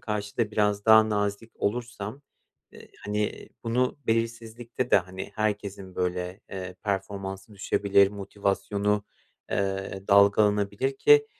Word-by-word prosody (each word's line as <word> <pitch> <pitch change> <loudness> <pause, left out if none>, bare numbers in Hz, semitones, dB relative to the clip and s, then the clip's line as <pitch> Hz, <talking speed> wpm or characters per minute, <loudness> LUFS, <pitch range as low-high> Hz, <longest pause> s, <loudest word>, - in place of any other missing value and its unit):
karşı 105 -2 -4
da 115 -3 +1
biraz 105 -1 +1
daha 110 0 +7
nazik 105 +1 -2
olursam, 115 +3 -3 0.5
eee, - - -14 0.2
hani, 105 0 -2 0.2
bunu 125 +4 0
belirsizlikte 115 +2 -2
de, - - +7
hani, 95 +2 -7
herkesin, 100 -3 -3
böyle, 90 +1 -2
eee, 95 -1 -6
performansı 100 0 -4
düşebilir, 100 0 +3
motivasyonu, 100 +1 -1 0.5
eee, 95 0 -2
dalgalanabilir. 105 - +4
Ki 440 -1 +6
105 Hz, 110 wpm, -27 LUFS, 100-110 Hz, 0.5 s, daha